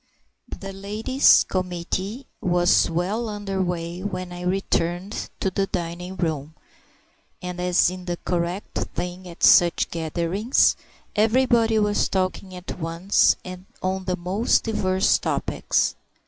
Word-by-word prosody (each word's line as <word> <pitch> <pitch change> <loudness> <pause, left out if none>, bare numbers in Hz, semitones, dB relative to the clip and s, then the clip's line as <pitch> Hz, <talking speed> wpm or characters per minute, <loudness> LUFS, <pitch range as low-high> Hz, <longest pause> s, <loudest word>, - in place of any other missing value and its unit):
The 195 0 -7
Ladies' 210 +7 +3
Committee 185 +6 -3 0.2
was 175 0 +3
well 195 +8 -1
under 205 -2 -3
way 175 -1 -3
when 185 -2 -4
I 175 0 -7
returned 180 +1 -1
to 190 - 0
the 195 +1 0
dining 175 +2 -4
room, 155 -3 -3 0.8
and 180 0 -5
as 180 0 +3
is 185 0 -8
the 175 -1 -3
correct 175 +2 -2 0.2
thing 180 +1 -4
at 170 -1 -10
such 175 -1 +5
gatherings, 170 - +1 0.4
everybody 225 0 +3
was 210 -1 +2
talking 185 0 -2
at 180 0 -7
once 165 +4 +3
and 185 +1 -9 0.2
on 190 0 -1
the 180 -1 -1
most 190 +6 +1
diverse 190 -4 +2
topics. - - 0
185 Hz, 125 wpm, -24 LUFS, 175-200 Hz, 0.8 s, such